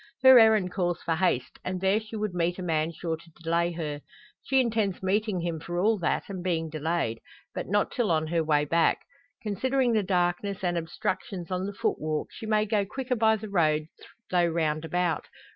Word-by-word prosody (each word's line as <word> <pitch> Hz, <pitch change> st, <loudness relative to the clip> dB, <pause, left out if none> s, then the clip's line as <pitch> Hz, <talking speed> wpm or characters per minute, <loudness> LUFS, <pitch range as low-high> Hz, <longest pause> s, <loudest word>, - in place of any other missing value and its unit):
Her 260 Hz, -1 st, +10 dB
errand 215 Hz, -5 st, +5 dB
calls 175 Hz, -2 st, -1 dB
for 165 Hz, -, 0 dB
haste, 165 Hz, -9 st, 0 dB
and 185 Hz, 0 st, -3 dB
there 190 Hz, +3 st, +2 dB
she 220 Hz, 0 st, -9 dB
would 210 Hz, -3 st, -2 dB
meet 175 Hz, 0 st, 0 dB
a 185 Hz, -, -5 dB
man 160 Hz, -2 st, 0 dB
sure 165 Hz, 0 st, -3 dB
to 165 Hz, -, -18 dB
delay 170 Hz, +1 st, +1 dB
her. 150 Hz, -3 st, -4 dB, 0.4 s
She 265 Hz, -1 st, +2 dB
intends 220 Hz, -7 st, 0 dB
meeting 200 Hz, -1 st, 0 dB
him 170 Hz, -2 st, -2 dB
for 175 Hz, +3 st, -5 dB
all 215 Hz, +3 st, +2 dB
that, 175 Hz, -, 0 dB
and 185 Hz, -3 st, -6 dB
being 165 Hz, -3 st, -1 dB
delayed; 155 Hz, -7 st, -1 dB, 0.3 s
but -, -, -4 dB
not 205 Hz, +2 st, +1 dB
till 240 Hz, -5 st, 0 dB
on 160 Hz, -1 st, +2 dB
her 165 Hz, +1 st, 0 dB
way 150 Hz, -1 st, +2 dB
back. 165 Hz, +3 st, +2 dB, 0.4 s
Considering 250 Hz, +4 st, +1 dB
the 215 Hz, -, +3 dB
darkness 185 Hz, +1 st, -1 dB
and 175 Hz, -1 st, +1 dB
obstructions 175 Hz, +2 st, -3 dB
on 185 Hz, +1 st, -1 dB
the -, -, -3 dB
footwalk 155 Hz, -4 st, -1 dB
she 220 Hz, -, -8 dB
may 215 Hz, -1 st, +2 dB
go 210 Hz, -1 st, +1 dB
quicker 255 Hz, +5 st, -3 dB
by 220 Hz, -1 st, +4 dB
the 215 Hz, 0 st, -7 dB
road 155 Hz, -5 st, +1 dB, 0.4 s
though 175 Hz, -1 st, +3 dB
roundabout. 165 Hz, +1 st, -1 dB
180 Hz, 195 wpm, -27 LUFS, 165-210 Hz, 0.4 s, Her